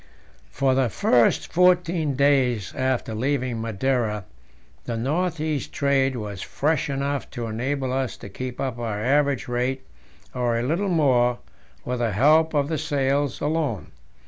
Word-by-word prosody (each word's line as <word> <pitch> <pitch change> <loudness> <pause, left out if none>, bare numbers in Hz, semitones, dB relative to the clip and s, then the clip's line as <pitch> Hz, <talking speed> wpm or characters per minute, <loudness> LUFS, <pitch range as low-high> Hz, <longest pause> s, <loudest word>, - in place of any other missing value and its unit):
For 135 -1 +1
the 130 -2 +2
first 120 +2 +2
fourteen 175 -4 +3
days 130 -7 +2
after 130 -3 -1
leaving 125 0 -1
Madeira 115 -2 -1 0.6
the 115 - -3
north 160 +7 -1
east 155 -3 -2
trade 135 -2 +1
was 105 -5 -5
fresh 150 0 -1
enough 140 0 -2
to 120 - -5
enable 130 +4 -2
us 130 -2 -2
to - - -10
keep 125 +5 -6
up 130 -3 -3
our 110 -3 -3
average 140 +3 +1
rate, 125 +2 -1 0.5
or 120 -2 0
a 115 - -1
little 170 +10 0
more, 125 -7 +3 0.5
with 125 0 -2
the 115 -3 0
help 155 - +4
of 140 -1 +2
the 155 -1 -2
sails 140 -2 0
alone. 150 - -1
130 Hz, 145 wpm, -24 LUFS, 120-145 Hz, 0.6 s, help